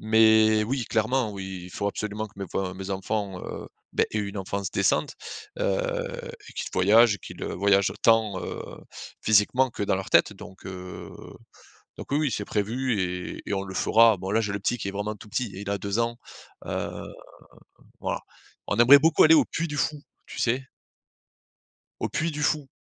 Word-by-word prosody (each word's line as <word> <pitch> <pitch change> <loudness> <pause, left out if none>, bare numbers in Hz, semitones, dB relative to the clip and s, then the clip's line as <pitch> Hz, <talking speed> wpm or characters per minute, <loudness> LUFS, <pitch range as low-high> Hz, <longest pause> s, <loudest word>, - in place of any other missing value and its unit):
Mais 110 0 +5
oui 125 +1 -2
clairement 115 +1 0
oui, 95 -2 -6
il 90 - -11
faut 100 - -3
absolument 105 +1 -3
que 105 - -20
mes 100 - -4
enfin 95 -1 -2
mes 95 +1 -7
enfants, 95 0 -2
heu, - - -7 0.2
beh, - - +2
aient 110 - -1
une 100 0 -4
enfance 95 0 -3
décente, 100 +9 +1 0.4
heu, - - -1 0.3
et - - -12
qu'ils - - -4
voyagent. 105 +3 +5
Qu'ils - - -10
voyagent 100 0 +2
tant, 110 -4 +3
heu, - - -5 0.6
physiquement, 115 +5 +3
que 105 - -5
dans - - +1
leur 95 0 -4
tête - - +5
donc, 95 0 -12
heu, 90 -1 -8 0.9
donc - - -9
oui-oui 150 0 +1
c'est 105 - -2
prévu 115 +3 -1
et, 90 -1 -4
et 100 - 0
on 95 - -1
le 95 -1 -8
fera. 115 +1 +5
Bon 95 +1 -5
là 110 +2 +3
j'ai 105 -3 -2
le 100 - -2
petit 120 +5 -1
qui 100 - -4
est - - -1
vraiment 105 +2 -3
tout 105 +1 -14
petit. 120 +2 -2
Il 100 +1 -5
a 100 - 0
2 100 +3 -1
ans, 115 0 -1 0.5
heu, - - -2 1.1
voilà. - - -3 0.5
On - - -1
aimerait 135 +4 +9
beaucoup 160 +1 +5
aller 160 +1 +8
au - - +6
Puy 170 +1 -3
du 150 -1 -5
Fou 150 +1 0 0.3
tu - - -9
sais? 125 +3 +1 1.4
Au - - -1
Puy 165 +1 -1
du 150 -1 -5
Fou. 145 -1 +1
105 Hz, 190 wpm, -26 LUFS, 100-125 Hz, 1.4 s, aimerait